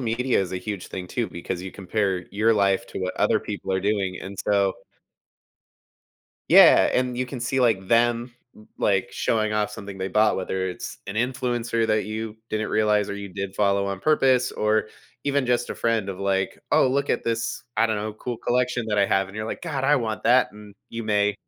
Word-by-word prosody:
media 125 +1 +1
is 95 -1 -3
a - - -1
huge 95 0 -5
thing 90 -1 -7
too 120 +3 -1
because 85 +1 -5
you 95 0 -7
compare 95 -2 -2
your 110 +3 +2
life 100 -2 +2
to - - -6
what 90 0 -3
other - - +2
people 95 - -5
are 95 - +1
doing, 100 -2 -1
and 100 +1 -8
so 100 -2 +2 1.8
Yeah, - - +7
and 125 -1 0
you 130 - 0
can 125 0 -7
see, 125 +3 -1
like, 110 -6 +2
them, 120 +1 +2 0.2
l 105 - -17
like, 95 -2 +1
showing 110 +2 0
off 105 -1 0
something 100 -2 -8
they 95 0 -3
bought, 105 +3 +3
whether 95 0 -2
it's 90 - -7
an 100 - -5
influencer 120 -2 0
that 110 -1 +1
you 110 0 -5
didn't 110 0 -1
realize 105 -1 +2
or - - -3
you 100 -1 -7
did 95 +1 -5
follow 100 -1 +2
on 100 -1 -3
purpose 130 -2 +3
or 110 0 +1 0.4
even 140 -2 +1
just 120 0 0
a - - -3
friend 115 -4 0
of, 95 0 -8
like, 95 -1 0
"Oh, - - +5
look 140 +2 0
at - - 0
this," 115 +1 -2
I 115 - +5
don't 110 -1 -1
know, 105 +1 -3
cool 120 +3 -5
collection 125 0 0
that 105 - 0
I 100 - +4
have," 95 0 +2
and 95 - -13
you're 110 0 -3
like, - - -5
"God, 145 -6 -3
I 150 +2 +4
want 110 -3 -2
that," 125 -1 +4
and 105 -1 -13 0.2
you 115 0 -5
may 105 -1 +1
110 Hz, 210 wpm, -24 LUFS, 100-120 Hz, 1.8 s, Yeah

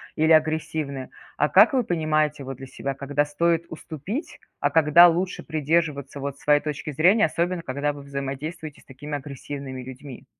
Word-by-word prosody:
или 160 +1 +2
агрессивны? 155 -3 +1 0.3
А 150 - +2
как 210 +7 +6
вы 255 - +2
понимаете, 155 -5 0
вот, 135 -1 -7
для 135 - -9
себя, 135 +1 -4
когда 140 +2 0
стоит 165 +3 0
уступить, 165 - -6 0.2
а - - +1
когда 160 +2 +7
лучше 175 +2 -1
придерживаться 150 -2 -1
вот 140 0 -5
своей 145 0 +3
точки 150 0 -4
зрения, 185 - +4
особенно 170 +2 -1
когда 145 +1 -2
вы 145 - -10
взаимодействуете 140 +3 -6
с - - -25
такими 145 +2 -7
агрессивными 140 -1 -7
людьми? 130 +1 -10
150 Hz, 160 wpm, -24 LUFS, 140-165 Hz, 0.3 s, когда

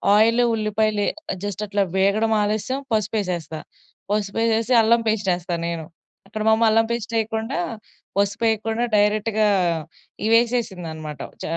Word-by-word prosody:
Oil, 230 +3 +4
ఉల్లిపాయలు 215 -1 0 0.3
ఎ - - -5
just 205 0 -4
అట్ల 205 0 -1
వేగడం 200 +4 +2
ఆలస్యం 215 +6 -1
పసుపెసేస్తా. 185 -7 -1 0.5
పసుపెసేసి 225 +3 +1
అల్లం 230 +1 +4
పేస్టెస్తా 180 -5 0
నేను. 165 -2 -4 0.4
అక్కడ 215 +1 -6
మామ్మ 220 +1 +4
అల్లం 225 +1 +3
పేస్టెయకుండా 225 +1 -2 0.6
పసుపెయకుండా 220 +3 0
డైరెక్ట్‌గా 210 +1 +2 0.8
ఇవెసేసిందనమాట. 190 - 0 0.2
చ - - -6
215 Hz, 105 wpm, -22 LUFS, 200-225 Hz, 0.8 s, Oil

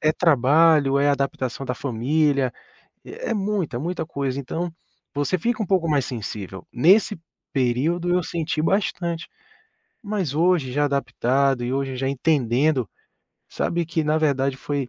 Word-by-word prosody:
é 155 0 +3
trabalho, 150 -2 +4
é 145 +1 +3
adaptação 135 -2 -2
da 125 - -2
família, 140 +2 +1 0.5
é 480 +3 -7
é - - +2
muita, 195 - -1
muita 170 +1 -3
coisa. 140 -3 -3
Então 165 +5 -3 0.4
você 145 +5 0
fica 230 +4 -1
um - - -3
pouco 180 -3 +1
mais 145 -4 +2
sensível. 100 -5 -6
Nesse 190 - +4 0.4
período 145 +7 0
eu 180 - +3
senti 160 -2 -2
bastante, 170 -2 -1 0.8
mas 200 -9 -2
hoje 165 -6 +2
já 145 +2 +1
adaptado 135 -1 +1
e 125 - -2
hoje 135 -1 -2
já 135 +1 -1
entendendo, 135 -2 +1 0.6
sabe, 170 0 -1
que 165 -1 -1
na 155 +1 +2
verdade 135 -3 +1
foi 140 -1 -3
145 Hz, 145 wpm, -23 LUFS, 130-170 Hz, 0.8 s, trabalho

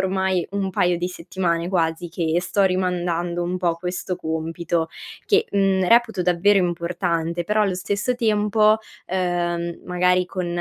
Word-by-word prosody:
ormai 190 -2 0
un 195 -1 -1
paio 180 -1 +2
di 175 +1 -2
settimane 170 -1 -2
quasi 170 -1 0
che 165 -1 -1
sto 185 +2 0
rimandando 175 -2 0
un 180 +1 -2
po' 175 -2 +1
questo 180 +1 -4
compito 160 +1 -2 0.4
che, 435 +2 +3
mhmm, 195 -2 +2
reputo 230 -5 +4
davvero 180 +3 +3
importante 170 -1 -1
però 210 +3 +2
allo 195 -3 +1
stesso 205 +6 -1
tempo, 215 -2 +3 0.3
uhm, 175 -2 -1
magari 180 0 +2
con 180 -1 -4
180 Hz, 140 wpm, -22 LUFS, 170-190 Hz, 0.4 s, reputo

